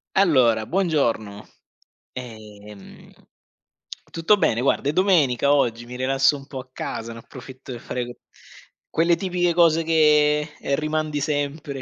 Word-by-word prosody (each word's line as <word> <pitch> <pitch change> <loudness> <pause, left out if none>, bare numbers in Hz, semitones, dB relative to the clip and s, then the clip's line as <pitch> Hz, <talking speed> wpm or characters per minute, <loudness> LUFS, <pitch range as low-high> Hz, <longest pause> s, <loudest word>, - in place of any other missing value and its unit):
Allora 130 - +3
buongiorno. 120 - -1 0.7
Ehm. 105 -4 -12 1.0
Tutto 165 +6 +2
bene, 120 - +1
guarda 140 +1 +1
è - - -1
domenica 145 - +3
oggi, 120 -4 0
mi 125 +1 -9
rilasso 135 +3 +2
un 135 0 -14
po' 135 - -8
a 130 - -11
casa, 115 -2 -6
ne 115 - -10
approfitto 130 +2 -12
per 120 -2 -7
fare 125 -1 -4
q 120 - -8 0.8
quelle 170 +1 +2
tipiche 180 -2 -1
cose 165 -1 +3
che 150 -2 +3 0.3
rimandi 155 -1 -2
sempre 145 -1 -3
140 Hz, 130 wpm, -22 LUFS, 120-160 Hz, 1.0 s, Allora